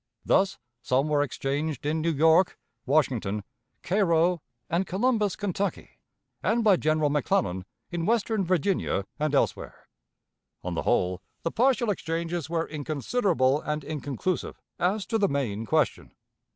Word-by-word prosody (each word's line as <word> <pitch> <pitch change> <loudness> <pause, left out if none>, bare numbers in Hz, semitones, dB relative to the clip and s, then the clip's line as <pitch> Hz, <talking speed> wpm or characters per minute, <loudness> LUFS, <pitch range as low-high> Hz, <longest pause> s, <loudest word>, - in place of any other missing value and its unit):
Thus 190 0 +3 0.2
some 130 +4 +1
were 150 -1 +3
exchanged 145 +1 -2
in 155 +2 0
New 165 - +1
York, 160 +4 +4 0.3
Washington, 120 -8 +1 0.4
Cairo, 175 -3 +2 0.3
and 175 +3 0
Columbus, 210 0 +1
Kentucky, 200 -2 -3 0.4
and 225 +5 +1
by 210 -3 +6
General 155 -2 +1
McClellan 95 -10 0 0.3
in 170 -1 -2
western 225 -2 +1
Virginia 180 - 0
and 150 -1 +1
elsewhere. - - -1 0.8
On - - -3
the - - -1
whole, 90 0 +1 0.2
the 165 - -1
partial 245 -1 +2
exchanges 165 -3 -3
were 165 -1 -1
inconsiderable 150 - 0
and 150 0 -3
inconclusive 150 +4 -3 0.2
as 190 +3 +1
to 225 +3 0
the 200 - +3
main 115 -6 -2
question. - - 0
160 Hz, 130 wpm, -27 LUFS, 140-190 Hz, 0.8 s, by